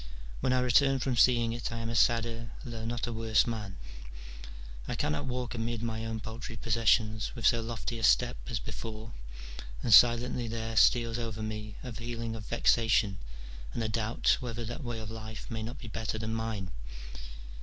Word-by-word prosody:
When 130 - +1
I 130 0 +3
return 135 +2 +4
from 130 -1 -1
seeing 120 -1 +4
it 120 0 -4
I 115 - -4
am 115 0 -3
a - - -2
sadder, 115 0 +2 0.2
though 115 -2 -5
not 120 +1 -2
a 120 - -4
worse 110 -2 +3
man, 105 -5 -4 1.1
I - - -2
cannot 75 - -1
walk 125 -1 -3
amid 115 -1 -2
my 110 -1 -2
own 110 -1 -4
paltry 115 +1 -7
possessions 110 -1 +2
with 120 - -4
so 115 - +5
lofty 115 0 -4
a - - -5
step 120 +2 +4
as 125 - -2
before, 110 +1 -7 0.7
and 115 - +3
silently 120 +2 +6
there 115 0 -4
steals 115 0 +4
over 110 -2 -4
me 110 -1 -5
a 125 - -6
feeling 115 0 -4
of 105 -3 -8
vexation, 110 -4 +3 0.6
and 115 - -1
a - - 0
doubt 110 0 +2
whether 120 -2 -4
that 120 +6 -5
way 120 -2 -3
of 110 -1 -6
life 110 0 -7
may 110 -1 -3
not 120 +5 -5
be 120 - -9
better 110 0 -3
than 110 0 -3
mine. 110 -5 -3
115 Hz, 185 wpm, -30 LUFS, 110-120 Hz, 1.1 s, silently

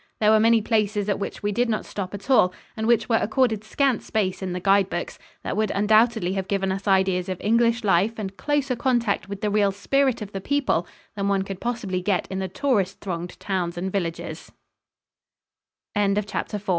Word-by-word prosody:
There 215 0 +4
were 220 - +6
many 225 0 +4
places 210 -2 0
at 200 - 0
which 200 - -5
we 205 - 0
did 240 +4 +1
not 215 - -1
stop 195 -1 -5
at 200 +2 -10
all, 245 -9 +5 0.2
and 220 -1 -2
which 235 -1 +3
were 225 - +3
accorded 220 -1 +1
scant 260 +2 +1
space 195 -4 -1
in 190 -1 -3
the 180 - -3
guide 195 +1 +3
books, - - -4 0.2
that - - -3
would 215 -1 +1
undoubtedly 215 -1 +3
have 195 -1 -3
given 195 -1 0
us 195 +2 -4
ideas 190 -1 +2
of 185 - -3
English 230 +2 +2
life 200 +3 +2
and 195 -3 -5
closer 280 +1 0
contact 235 -6 0
with 200 -1 -6
the 210 - 0
real 205 -1 +3
spirit 255 +4 +1
of 200 - -9
the 195 - -5
people 270 - 0 0.3
than 200 -1 -1
one 195 -1 +1
could 195 -1 -7
possibly 230 -7 -2
get 185 -1 0
in 190 - -2
the 190 - -2
tourist 200 -3 0
thronged 175 -2 -5
town 185 -3 -1
205 Hz, 185 wpm, -24 LUFS, 190-230 Hz, 0.3 s, were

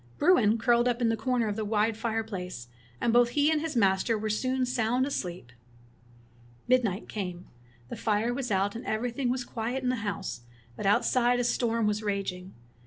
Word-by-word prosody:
Bruin 230 - +4
curled 240 +1 +3
up 245 -1 0
in 235 -2 +2
a - - +1
corner 245 0 0
of 205 - -2
the 220 - -2
wide 215 +1 +1
fire 225 0 -1
place, 180 - -6 0.3
and 230 - +1
both 240 0 +5
he 290 +4 +2
and 310 -1 +1
his 320 -3 -4
master 200 +1 +2
were 215 0 -2
soon 255 +4 0
sound 245 +1 +1
asleep. 180 - -4 1.2
Midnight 230 -6 +1
came. 180 -4 -5 0.4
The - - -5
fire 220 +2 0
was 255 -1 -3
out, 200 +1 0
and 230 - -6
everything 245 +3 -2
was 255 0 -1
quiet 240 +3 -4
in 250 - +1
the 255 - 0
house, 200 - -4 0.3
but 195 - -3
out 200 - +3
side 245 -1 +2
a - - +1
storm 230 -2 +1
was 210 0 0
raging. 195 -3 -3
225 Hz, 190 wpm, -28 LUFS, 205-245 Hz, 1.2 s, both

